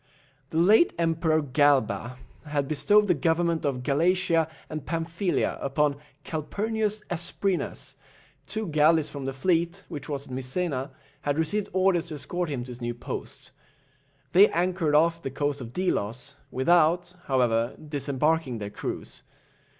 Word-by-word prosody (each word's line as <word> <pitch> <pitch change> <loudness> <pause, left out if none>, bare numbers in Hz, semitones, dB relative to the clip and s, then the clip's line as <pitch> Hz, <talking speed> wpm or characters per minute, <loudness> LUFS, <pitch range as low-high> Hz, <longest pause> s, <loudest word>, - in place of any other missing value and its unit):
The 160 - -3
late 210 - +5
Emperor 165 -2 +1
Galba 130 -4 +2 0.3
had 145 -2 -1
bestowed 205 +8 +4
the 180 - +4
government 165 +1 +1
of 130 -3 -1
Galatia 165 +3 +2 0.2
and 155 -2 -5
Pamphilia 170 +3 -1
upon 140 +1 +1 0.3
Calphurnius 210 +7 -2
Asprenas; 175 -5 -1 0.5
two 220 0 -3
galleys 155 0 +4
from 140 -2 -6
the 135 - -1
fleet, 170 +6 0
which 150 0 -7
was 140 -1 -3
at 130 - -9
Misena, 130 +1 -2 0.3
had 145 0 -1
received 175 +6 0
orders 185 -2 +2
to 155 - -6
escort 175 +4 -3
him 130 -4 -3
to 125 - -9
his 120 0 -10
new 120 0 -3
post. 120 - -7 0.8
They 195 +4 +7
anchored 175 -3 +1
off 165 +2 +3
the 135 - -3
coast 145 +1 -2
of 115 -2 -7
Delos, 125 - -2 0.2
without, 170 +5 +3
however, 120 -3 +1
disembarking 145 -2 -1
their 105 -1 -5
crews. - - -6
155 Hz, 140 wpm, -27 LUFS, 135-175 Hz, 0.8 s, They